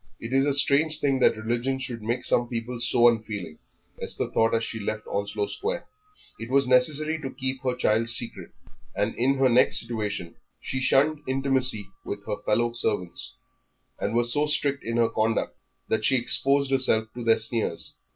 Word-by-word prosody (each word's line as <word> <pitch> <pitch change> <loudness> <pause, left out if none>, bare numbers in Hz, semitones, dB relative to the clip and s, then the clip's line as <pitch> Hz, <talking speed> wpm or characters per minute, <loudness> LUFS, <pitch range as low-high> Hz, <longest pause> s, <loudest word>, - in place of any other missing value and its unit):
"It 115 +3 -7
is 135 +1 +3
a 145 - +2
strange 155 +2 +4
thing 135 -3 +1
that 115 - +3
religion 120 +4 -2
should 125 -3 -6
make 115 +4 -2
some 120 - +2
people 120 0 -5
so 120 0 +4
unfeeling," 105 -8 -2 0.4
Esther - - 0
thought 115 0 +2
as 115 - 0
she 115 - -4
left 105 +1 -4
Onslow 100 0 -3
Square. 465 - -4 0.5
It 115 +1 -7
was 135 0 +3
necessary 150 +5 +3
to 135 - -5
keep 130 0 -4
her 130 -1 -1
child 115 -1 +1
secret, 120 -1 0 0.5
and 105 +2 -1
in 130 +3 +1
her 135 -1 +3
next 125 0 +3
situation 105 -7 -4 0.3
she 130 - -4
shunned 145 +4 +2
intimacy 130 -5 +1 0.2
with 100 0 -7
her 105 - -3
fellow 120 +2 +1
servants, 105 -7 -3 0.6
and - - -2
was 120 0 +1
so 150 +1 +1
strict 145 -2 0
in 115 0 -3
her 115 -1 +3
conduct 110 +1 -1 0.3
that 110 -1 -1
she 135 - +3
exposed 135 +3 +2
herself 130 -5 +2
to 120 - -7
their 115 -1 +4
sneers. 115 0 -2
120 Hz, 180 wpm, -25 LUFS, 110-135 Hz, 0.6 s, strange